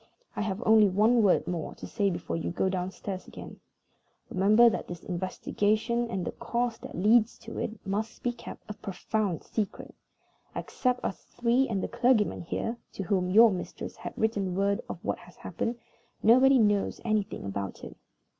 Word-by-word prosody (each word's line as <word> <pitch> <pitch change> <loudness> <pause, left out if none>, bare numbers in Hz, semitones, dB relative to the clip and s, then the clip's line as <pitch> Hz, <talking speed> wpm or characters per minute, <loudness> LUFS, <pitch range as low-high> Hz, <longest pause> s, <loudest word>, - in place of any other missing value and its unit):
I - - -2
have 210 +2 -2
only 215 -2 +6
one 220 +5 +4
word 200 -4 +3
more 170 -3 -3
to - - -9
say 205 -3 0
before 170 -2 -3
you 165 - -2
go 185 +2 0
downstairs 185 +1 -4
again. - - -10 0.7
Remember 210 +5 +6
that 230 - 0
this 175 -2 -8
investigation 215 +6 -1
and 190 -5 -2
the - - -2
cause 235 -1 -2
that - - -9
leads 220 +4 +4
to 225 - -8
it 220 -1 -5
must 215 +4 -3
be 245 - +1
kept 240 - -11
a 210 - -5
profound 200 -2 -2
secret. 210 -3 -4 0.6
Except 250 -1 -1
us 190 - -3
three, 245 +3 +1
and 195 -4 -1
the - - -1
clergyman 240 -4 +2
here 225 +7 -3 0.2
(to 195 - -4
whom 180 0 0
your 225 +4 +7
mistress 180 -2 -5
has - - -7
written 200 -5 0
word 200 +1 +1
of - - -4
what - - -1
has - - -16
happened), 235 +1 -3 0.5
nobody 260 +4 +6
knows 205 -4 +2
anything 215 - -1
about 100 0 -5
it. - - -8
210 Hz, 175 wpm, -28 LUFS, 190-230 Hz, 0.7 s, your